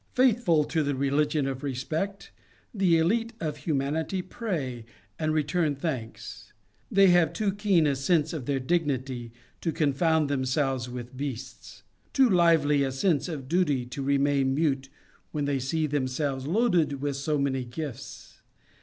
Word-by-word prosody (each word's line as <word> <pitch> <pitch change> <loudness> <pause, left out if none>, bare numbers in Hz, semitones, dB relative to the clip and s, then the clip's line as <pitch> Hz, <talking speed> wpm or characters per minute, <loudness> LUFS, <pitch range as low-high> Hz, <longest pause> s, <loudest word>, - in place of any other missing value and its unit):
Faithful 235 - +4
to 160 +2 -1
the 145 -2 -1
religion 140 +2 +1
of 135 -1 -3
respect, 155 +9 -3 0.4
the 190 -6 +3
elite 225 +8 +1
of 155 -6 -3
humanity 155 +5 -1
pray 160 - -4 0.4
and 155 0 0
return 155 0 +1
thanks. 135 -6 -6 0.4
They 195 -1 +5
have 175 -2 +4
too 205 +3 0
keen 200 -5 +2
a 140 -2 +2
sense 155 +3 +1
of 145 -7 -5
their 140 -2 0
dignity 130 -5 -1 0.3
to 165 - 0
confound 160 0 +2
themselves 130 -2 0
with 125 +1 -7
beasts; 130 -5 -7 0.3
too 265 -1 +5
lively 165 -7 +4
a 135 -1 0
sense 145 +4 +1
of 140 -6 -6
duty 150 -6 +1
to 125 +3 -6
remain 140 -1 +2
mute 135 -3 0 0.4
when 150 -2 -2
they 140 -1 0
see 155 +5 -1
themselves 135 -1 -2
loaded 175 - +2
with 140 0 -2
so 150 +2 -1
many 135 -2 0
gifts. 130 +1 -8
145 Hz, 145 wpm, -27 LUFS, 135-165 Hz, 0.4 s, They